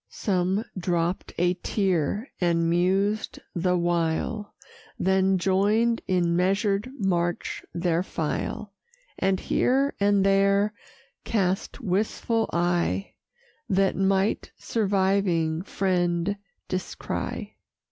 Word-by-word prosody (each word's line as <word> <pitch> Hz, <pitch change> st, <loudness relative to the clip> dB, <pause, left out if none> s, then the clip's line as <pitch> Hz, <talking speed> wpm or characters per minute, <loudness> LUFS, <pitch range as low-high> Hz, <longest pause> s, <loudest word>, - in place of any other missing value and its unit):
Some 190 Hz, +2 st, 0 dB
dropp'd 175 Hz, 0 st, -1 dB
a 175 Hz, +1 st, +3 dB
tear, 195 Hz, -, 0 dB
and 170 Hz, -1 st, +2 dB
mused 190 Hz, +5 st, +1 dB, 0.2 s
the 180 Hz, 0 st, +1 dB
while, 175 Hz, +5 st, -1 dB, 0.4 s
Then 190 Hz, 0 st, +2 dB
join'd 205 Hz, +5 st, +2 dB
in 175 Hz, -2 st, +2 dB
measured 195 Hz, +4 st, +1 dB
march 175 Hz, -5 st, -1 dB
their 170 Hz, -1 st, 0 dB
file; 185 Hz, +4 st, -3 dB, 0.5 s
And 190 Hz, -1 st, +2 dB
here 275 Hz, +3 st, +1 dB
and 200 Hz, -1 st, +3 dB
there 200 Hz, +1 st, +3 dB, 0.5 s
cast 195 Hz, +4 st, -1 dB
wistful 220 Hz, +2 st, 0 dB
eye, 175 Hz, +3 st, 0 dB, 0.6 s
That 195 Hz, 0 st, +2 dB
might 195 Hz, +1 st, +1 dB
surviving 190 Hz, -6 st, +1 dB
friend 180 Hz, -1 st, 0 dB, 0.3 s
descry. 185 Hz, 0 st, -4 dB
190 Hz, 90 wpm, -26 LUFS, 175-200 Hz, 0.6 s, a